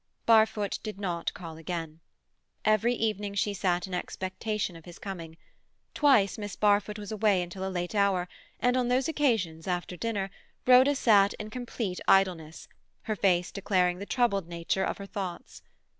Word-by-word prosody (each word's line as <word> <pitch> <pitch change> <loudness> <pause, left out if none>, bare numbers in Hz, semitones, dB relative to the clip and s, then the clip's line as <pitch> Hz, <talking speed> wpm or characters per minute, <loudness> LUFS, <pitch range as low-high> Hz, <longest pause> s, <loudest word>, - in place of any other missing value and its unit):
Barfoot 220 -2 +3
did 215 -2 -6
not 175 -4 -2
call 165 -3 -8
again. 165 -1 -5 0.7
Every 215 +3 +3
evening 210 -3 -2
she 205 0 0
sat 180 -3 0
in 190 - -9
expectation 190 +2 -3
of 165 - -13
his 175 -1 -11
coming. 165 -5 -7 0.6
Twice 250 -10 +3
Miss 205 -2 -5
Barfoot 210 0 +2
was 205 -1 -7
away 210 -4 +2
until 175 +2 -7
a - - -2
late 175 0 -3
hour, 200 -3 +2 0.3
and 245 0 +2
on 250 -1 +1
those 255 +2 +2
occasions, 220 - 0
after 180 0 -2
dinner, 195 -1 -2 0.3
Rhoda 255 +3 +6
sat 205 -6 +4
in 215 0 -7
complete 230 -6 -4
idleness, 175 -5 +2 0.4
her 215 - -2
face 180 -3 +2
declaring 180 -3 +1
the 200 - -7
troubled 215 -8 +1
nature 170 +2 -1
of - - -2
her 200 - -7
thoughts. 190 -3 -6
200 Hz, 160 wpm, -28 LUFS, 180-215 Hz, 0.7 s, Rhoda